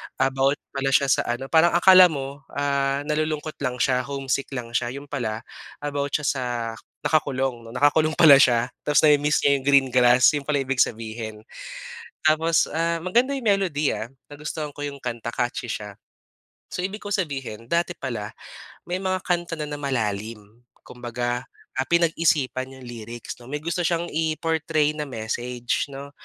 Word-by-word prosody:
about 135 +1 +2 0.2
pala 135 -1 -2
siya 140 -1 +3
sa - - +2
ano 120 +3 -3
parang 165 +1 +5
akala 185 +1 +8
mo, 140 -3 -5 0.2
ah, 140 0 0
nalulungkot 155 +1 -2
lang 125 -3 -2
siya 125 0 +2
homesick 135 -1 -2
lang 120 -2 -5
siya, 120 +1 -1
yun 140 +1 -10
pala 115 -5 -3 0.4
about 145 -1 -1
siya 150 - -1
sa 135 -2 0 0.6
nakakulong 135 -6 0
'no, 115 - -11
nakakulong 155 +3 +3
pala 145 -5 +8
siya 120 -1 +3 0.2
ta's 150 - +4
nami-miss 150 -1 +4
niya 140 0 +4
yung 130 - -13
green 140 -2 +5
grass 125 0 +6
yun 145 -2 -4
pala 145 -2 +1
ibig 135 -1 -2
sabihin. 110 -1 -2 0.8
Tapos, 160 +1 +3
ah, 165 +1 0
maganda 250 +9 +2
yung 255 - -7
melody, 185 -8 +2
ah, 110 - -5 0.2
nagustuhan 150 0 -5
ko 145 - -10
yung 145 -1 -4
kanta 120 -3 -5
catchy 120 +1 -3
siya. 105 -2 -5 0.8
So, 180 - -3
ibig 205 +3 -5
kong 205 - -7 0.2
sabihin 130 -7 -7
dati 170 +6 -1
pala 115 -6 -4 0.5
may 180 +1 -3
mga 185 -1 -2
kanta 175 -1 -1
na 155 - -4
na 145 -1 -5
malalim. 110 -5 -2 0.4
Kumbaga, 120 0 -4 0.3
ah, 130 - 0
pinag-isipan 155 -6 +1
yung 130 - -13
lyrics 120 -1 -8
no 120 - -14
may 145 +2 -5
gusto 170 +2 -2
siyang 170 -1 0
i 160 0 0
portray 160 -2 0
na 150 -1 -5
message 120 +1 -3
no 140 +1 -9
140 Hz, 165 wpm, -24 LUFS, 125-155 Hz, 0.8 s, akala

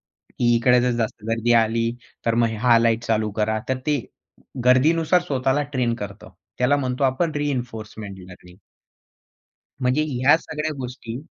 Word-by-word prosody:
की 120 -1 -1
इकडे 125 +1 +4
जर 125 - +1
जास्त 110 -1 -5
गर्दी 115 +1 +1
आली, 115 +1 0 0.4
तर 115 - +2
मग 115 0 +3
ह्या 115 +1 +3
लाईट 115 0 +2
चालू 110 -1 0
करा. 110 +1 +1
तर 130 - +1
ते 150 -2 +2 0.7
गर्दीनुसार 160 +7 +4
स्वतःला 135 -2 0
ट्रेन 125 -3 0
करतं. 100 -3 -8 0.3
त्याला 125 +3 +3
म्हणतो 130 -1 -1
आपण 135 +5 +1
रिइन्फोर्समेंट 110 -8 -4
लर्निंग. 90 0 -14 1.3
म्हणजे 130 +4 +2
ह्या 130 +4 +4
सगळ्या 155 -1 -4
गोष्टी 125 -2 -6
125 Hz, 145 wpm, -22 LUFS, 115-135 Hz, 1.3 s, इकडे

